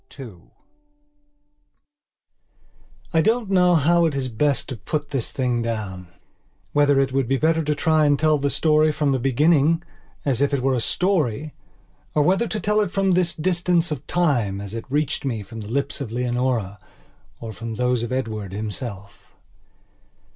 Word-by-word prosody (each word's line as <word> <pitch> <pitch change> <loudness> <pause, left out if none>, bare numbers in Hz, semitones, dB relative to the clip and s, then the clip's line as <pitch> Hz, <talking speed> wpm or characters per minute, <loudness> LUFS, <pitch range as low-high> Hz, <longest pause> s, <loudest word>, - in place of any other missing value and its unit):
II 115 -9 -9 2.8
I 160 - +4
DON'T 220 +1 +1
know 180 -2 +4
how 170 +2 +4
it 150 - -3
is 130 -2 -2
best 140 +5 0
to 130 - -4
put 145 +6 -4
this 135 -5 -2
thing 125 -3 -1
downwhether 110 +7 -3
it 135 -1 +1
would 135 -2 +1
be 135 +2 +1
better 160 +2 +2
to 150 0 0
try 155 +1 +2
and 145 -1 +3
tell 155 0 +2
the 140 +1 0
story 155 +1 +3
from 150 -1 0
the 135 - +1
beginning, 150 +5 +3 0.4
as 135 -3 0
if 140 0 +2
it 130 - -3
were 135 0 +2
a 125 - 0
story; 155 - 0 0.6
or 150 - +4
whether 190 +8 +2
to 215 - -3
tell 210 +1 +1
it 205 - 0
from 195 +1 +1
this 180 -1 +1
distance 175 0 +1
of 145 -2 -5
time, 125 - +1
as 100 0 -7
it 115 - -5
reached 145 +1 -1
me 115 -6 -2
from 115 +3 -10
the 105 - -8
lips 140 +3 -2
of 120 -6 -5
Leonora 120 -4 -1 0.6
or 115 -2 -7
from 115 +1 -6
those 125 0 +1
of 120 - -4
Edward 110 -7 -3
himself. 100 -2 -7
140 Hz, 170 wpm, -22 LUFS, 115-160 Hz, 2.8 s, I